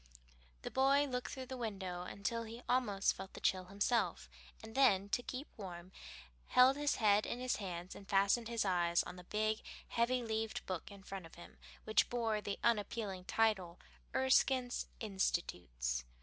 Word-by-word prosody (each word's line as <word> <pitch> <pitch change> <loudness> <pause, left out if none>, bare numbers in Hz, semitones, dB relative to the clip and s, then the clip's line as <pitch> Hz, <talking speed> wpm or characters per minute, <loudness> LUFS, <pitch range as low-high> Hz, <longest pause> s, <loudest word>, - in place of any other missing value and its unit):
The - - -4
boy 275 +2 +4
looked 250 -3 -3
through 260 -2 -5
the 260 - -6
window 190 -6 -4
until 200 +5 -3
he 230 +2 -8
almost 210 -6 +2
felt 190 - -8
the - - -7
chill 185 -1 +1
himself, 205 +5 0 0.4
and 220 0 -9
then, 200 -7 +4
to 245 - +1
keep 255 +3 -6
warm, 180 -3 -8 0.6
held 255 +2 +6
his 290 0 +1
head 210 -2 +4
in 245 - -3
his 255 0 0
hands 180 -3 -5
and 195 - -12
fastened 200 +3 +3
his 230 -2 0
eyes 175 -2 +2
on - - -8
the 180 -1 -11
big, 215 +2 0 0.3
heavy 245 +2 +1
leaved 220 -1 -2
book 185 -3 -4
in 200 -1 -12
front 190 -3 -7
of - - -17
him, 175 - -13 0.2
which 215 -1 +3
bore 225 -3 0
the 200 -1 -3
unappealing 205 -4 0
title, 190 -7 +1 0.4
Erskine's 260 -1 +3
"Institutes." 90 - -1
210 Hz, 165 wpm, -36 LUFS, 185-240 Hz, 0.6 s, held